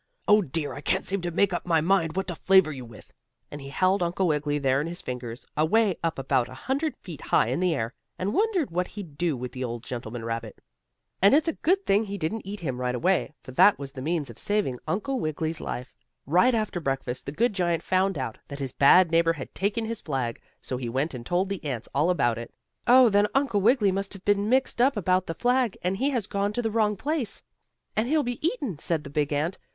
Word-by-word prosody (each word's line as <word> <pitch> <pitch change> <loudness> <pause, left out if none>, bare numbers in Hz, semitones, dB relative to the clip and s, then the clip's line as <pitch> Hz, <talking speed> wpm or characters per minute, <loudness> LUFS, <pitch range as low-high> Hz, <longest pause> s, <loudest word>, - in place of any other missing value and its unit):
Oh, 210 0 +6
dear, 155 -3 -3
I 140 - -7
can't - - 0
seem 195 0 -1
to 175 - -2
make 185 +2 +2
up 175 - -2
my 165 -2 +2
mind 165 -1 +1
what 190 0 -1
to - - -2
flavor 190 -1 +4
you 130 -4 -7
with," 115 -2 -14 0.4
and 145 - -7
he 135 - -8
held 185 +6 +2
Uncle 175 +2 0
Wiggily 150 -2 0
there 135 -1 +2
in 155 - -3
his 175 +1 -5
fingers, 125 0 -6
away 190 +6 +3
up 165 0 -1
about 135 -2 +1
a 130 - -10
hundred 280 - -2
feet - - -10
high - - +2
in - - -1
the 180 -3 +2
air, 115 -1 -3 0.2
and 195 +3 -2
wondered 400 - +1
what 180 +2 -1
he'd 180 -9 -9
do 165 -3 0
with 125 0 -5
the 130 +1 -5
old 120 -1 -4
gentleman 120 -2 -6
rabbit. 115 -1 -5 0.6
And 200 +7 +7
it's 310 +3 +3
a 325 - +1
good 385 +4 +1
thing 200 +3 +3
he 200 0 -5
didn't 190 +5 -3
eat 200 0 -6
him 130 -6 -3
right 125 0 -1
away, 175 +2 +1
for - - -9
that 200 +10 +6
was 140 -1 -7
the 135 -2 -8
means 155 -3 -1
of 115 - -13
saving 205 -12 0
Uncle 260 +7 -1
Wiggily's 155 -1 -2
life. 125 +1 -5 0.3
Right 185 - +4
after 215 -5 -1
breakfast 135 -4 -3
the - - -2
good 230 +8 +1
giant 175 -4 0
found 190 -1 +1
out 130 -5 -4
that 140 - -7
his 135 -3 -4
bad 170 +5 +6
neighbor 165 0 +4
had 140 -5 -8
taken 205 +4 -1
his 230 0 -4
flag, 130 -6 -3 0.2
so 125 - -3
he 125 -2 -4
went 135 +6 -1
and 125 -2 -6
told 175 +8 0
the 195 -2 -5
ants 125 -6 -4
all 150 +5 +2
about 120 -10 +1
it. 120 - -8 0.4
"Oh, 250 0 +7
then 205 0 +3
Uncle 270 -7 +2
Wiggily 215 -2 +4
must 195 +2 -2
have 195 -1 -12
been 205 +1 +2
mixed 260 -1 +2
up 260 -1 +3
about 185 -1 +1
the 165 - -3
flag, 245 -1 +1
and 185 +2 0
he 270 +6 +1
has 245 -7 -1
gone 200 0 -1
to 245 - -1
the 225 - 0
wrong 210 -2 +1
place, 280 - -2 0.5
and 215 +2 +1
he'll 305 +2 +2
be 245 +2 -4
eaten," 280 - -1
said 160 -2 -1
the 140 - -9
big 145 0 0
ant. 155 +6 -1
175 Hz, 240 wpm, -26 LUFS, 140-210 Hz, 0.6 s, And